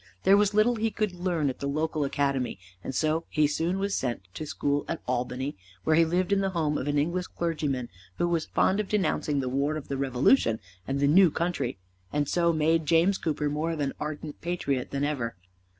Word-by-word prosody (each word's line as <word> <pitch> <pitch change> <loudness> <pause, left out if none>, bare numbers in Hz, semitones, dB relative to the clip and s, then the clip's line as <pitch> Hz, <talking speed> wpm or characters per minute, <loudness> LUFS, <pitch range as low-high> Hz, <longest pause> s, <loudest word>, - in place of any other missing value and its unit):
There 195 +1 +6
was 205 0 +3
little 230 +3 +4
he 225 +1 +1
could 215 -1 -1
learn 175 -4 0
at 130 - -3
the 140 - -2
local 155 +1 -1
academy, 140 -4 0 0.3
and 130 - -5
so 155 +3 +1
he 155 - +2
was 150 0 +2
soon 185 +6 0
sent 120 - -1
to 155 - -6
school 145 -1 0
at 165 - -4
Albany, 125 +2 -2 0.3
where 155 - +3
he 165 +1 +5
lived 180 +4 +1
in 200 - +3
the 195 - +1
home 150 -2 +1
of 130 - -4
an 145 0 +1
English 170 +5 0
clergyman 150 -7 -2 0.3
who 175 - +1
was 170 -2 0
fond 190 +2 +2
of 210 - -2
denouncing 155 -7 +1
the 130 - -3
war 140 +4 0
of 150 - -8
the 140 - -2
Revolution 130 -3 +3 0.3
and 135 +1 -1
the 140 - +3
new 180 +4 +6
country, 155 - -2 0.3
and 145 -1 0
so 170 +2 +2
made 160 0 +2
James 170 +5 +4
Cooper 150 -2 -1
more 150 +3 -1
of 165 -2 -3
an 140 -2 -1
ardent 150 0 -5
patriot 145 -7 -2
than 140 0 -2
ever. 125 -6 -1
155 Hz, 215 wpm, -27 LUFS, 140-175 Hz, 0.3 s, There